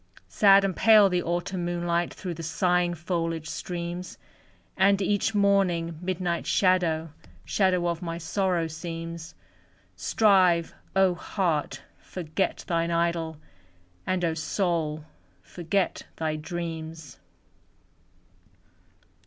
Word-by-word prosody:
Sad 195 -1 +5
and 190 -3 -1
pale 215 -3 +6
the 180 -1 +1
Autumn 175 +1 -2
moonlight 175 0 -1
Through 180 -3 -6
the 165 - -8
sighing 175 +2 +1
foliage 165 -1 -3
streams; 175 +1 -5 0.6
And 195 +1 +4
each 205 +2 0
morning, 180 -5 +2
midnight 180 -1 -2
shadow, 170 -4 +2 0.3
Shadow 185 -3 +1
of 170 -1 -2
my 170 -1 -4
sorrow 175 0 0
seems; 165 0 -7 0.6
Strive, 185 -6 +3 0.2
O 190 -1 +4
heart, 165 -6 -2 0.2
forget 180 +1 -3
thine 170 -1 0
idol! 170 -1 0 0.7
And, 185 -1 0
O 165 - +1
soul, 160 -2 -1 0.4
forget 180 +2 -1
thy 155 -1 -2
dreams! 160 -2 -6
175 Hz, 105 wpm, -26 LUFS, 165-185 Hz, 0.7 s, pale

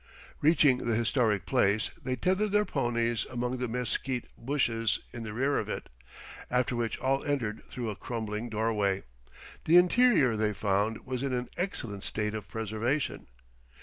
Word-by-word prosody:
Reaching 145 -4 +5
the 115 - +2
historic 110 -4 +1
place, 110 -5 +2
they 130 -1 -1
tethered 190 - +1
their 210 +1 +3
ponies 120 - 0
among 125 +1 -2
the 125 0 -2
mesquite 125 +1 -1
bushes 115 -5 0
in 120 - -6
the 110 -1 -5
rear 135 +6 +1
of - - -4
it, - - -5 0.6
after 125 0 +1
which 115 -1 -1
all 135 +1 0
entered 115 -7 -1
through 120 -3 -3
a - - -6
crumbling 110 +1 -4
doorway. 105 -3 0 0.6
The 165 +3 +6
interior, 180 - +5
they 105 0 +1
found, 105 +2 0
was 130 -1 -3
in 135 -1 -1
an 125 0 -2
excellent 115 - -3
state 105 0 -1
of 110 -3 -5
preservation. 110 +6 -2
120 Hz, 155 wpm, -29 LUFS, 110-135 Hz, 0.6 s, The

